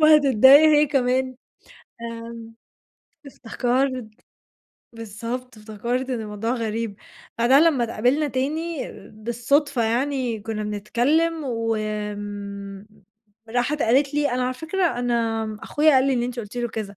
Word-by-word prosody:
وهتضّايق 290 -1 +7
هي 300 0 +5
كمان 260 -2 0 0.7
آآ، 230 0 -8 0.7
افتكرْت 255 -1 -1 0.9
بالضبط، 230 +2 -6
افتكرت 235 +5 -3
إن 245 - -2
الموضوع 210 +1 -4
غريب، 225 -3 -3 0.4
بعدها 255 +5 +5
لمّا 310 -7 +3
اتقابلنا 250 +7 +1
تاني 300 +4 -3 0.2
بالصُّدفة 240 +5 0
يعني 245 0 -1
كنّا 215 0 -4
بنتكلّم 260 +11 0
و 230 -3 -1
آمم، 205 -1 -5 0.6
راحت 250 +6 0
قالت 270 +5 +2
لي: 295 -1 +1
"أنا 250 +1 0
على 255 0 -2
فكرة 340 +7 -1
أنا 230 -2 0 0.2
أخويا 305 +1 +3
قال 260 0 +4
لي 275 - +2
إن 245 -2 0
أنتِ 245 0 -4
قُلتِ 210 +1 -10
له 240 -1 -1
كذا." 215 -3 -6
245 Hz, 125 wpm, -23 LUFS, 225-275 Hz, 0.9 s, وهتضّايق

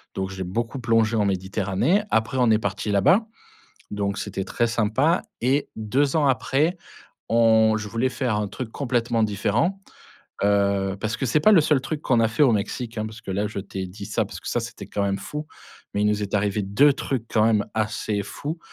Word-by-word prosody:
donc 95 0 -3
j'ai 95 -1 -5
beaucoup 115 +8 -3
plongé 115 -1 +2
en 105 -2 +2
Méditerranée, 95 - 0
après 110 +4 0
on 125 -2 +4
est 110 - +5
partis 100 0 -3
là-bas 180 - +4 0.6
donc 100 0 -2
c'était 95 -2 -4
très 120 - 0
sympa 115 - +1 0.2
et 135 +4 +1
2 130 +7 0
ans 150 -3 +3
après, 140 +6 +1 0.5
on 110 -1 +4
je 105 -1 -5
voulais 115 +5 0
faire 125 -5 -1
un 105 -1 -1
truc 120 0 -6
complètement 120 -4 0
différent. 135 - 0 0.6
Heu, 100 -1 +2
parce 110 +2 -2
que 135 - -1
c'est 140 +6 +2
pas 215 +8 +6
le 180 - +7
seul 150 -3 +2
truc 150 +2 -4
qu'on 120 -3 +2
a 115 - +3
fait 120 +7 0
au 135 - +6
Mexique, 110 +3 -3
hein, 110 - -1
parce 110 0 -9
que 95 - -8
là, 100 +2 0
je 105 - -6
t'ai 95 -1 -5
dit 100 +2 -9
ça - - 0
parce - - -9
que - - -7
ça - - 0
c'était - - -8
quand 100 - -2
même 100 0 0
fou 150 +9 -6 0.5
mais 100 - +1
il 105 - +3
nous 105 0 +1
est 100 0 -4
arrivé 105 0 +1
2 135 +10 +4
trucs 130 -4 -3
quand 110 -1 +4
même 110 -2 +3
assez 105 -1 -1
fou, 150 - -6
110 Hz, 210 wpm, -24 LUFS, 100-130 Hz, 0.6 s, le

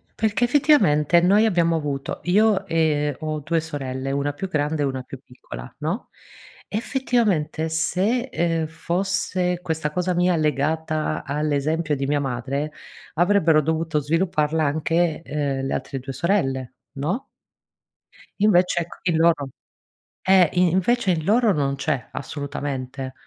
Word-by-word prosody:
Perché, 220 +2 0
effettivamente, 240 - +4
noi 205 +5 +4
abbiamo 170 -5 +2
avuto- 145 -3 -3
io, 200 +2 +3
ehm, 150 -3 +1
ho 155 -1 -3
2 165 +3 0
sorelle, 135 -4 -4
una 140 +1 0
più 190 +6 -4
grande 150 -2 -1
e - - +2
una 130 -1 -2
più 130 +1 -10
piccola, 60 - -11
no, 165 - -3 0.6
effettivamente, 215 - 0
se, 205 +10 0
ehm, 165 -2 0
fosse 180 +1 -1
questa 160 -3 -2
cosa 180 +2 -1
mia 180 0 +2
legata 155 +1 -1
all'esempio 150 +2 0
di 135 0 -2
mia 145 +1 +1
madre, 135 +3 -3 0.4
avrebbero 170 -3 +4
dovuto 160 0 0
svilupparla 160 0 0
anche, 160 +2 0
ehm, 140 -3 -2
le - - -2
altre 135 - -4
2 135 +1 -7
sorelle, 135 -7 0 0.2
no? 170 - -3 1.1
Invece, 180 -4 +3
ecc 170 - -9
in 170 -3 +1
loro 160 -4 +3 0.8
Eh, 185 -3 +6
in 180 0 +4
invece, 190 +2 +2
in 160 -2 -1
loro 220 +1 +3
non 140 -3 0
c'è, 140 -3 -2
assolutamente. 135 -2 -5
160 Hz, 135 wpm, -23 LUFS, 145-180 Hz, 1.1 s, Eh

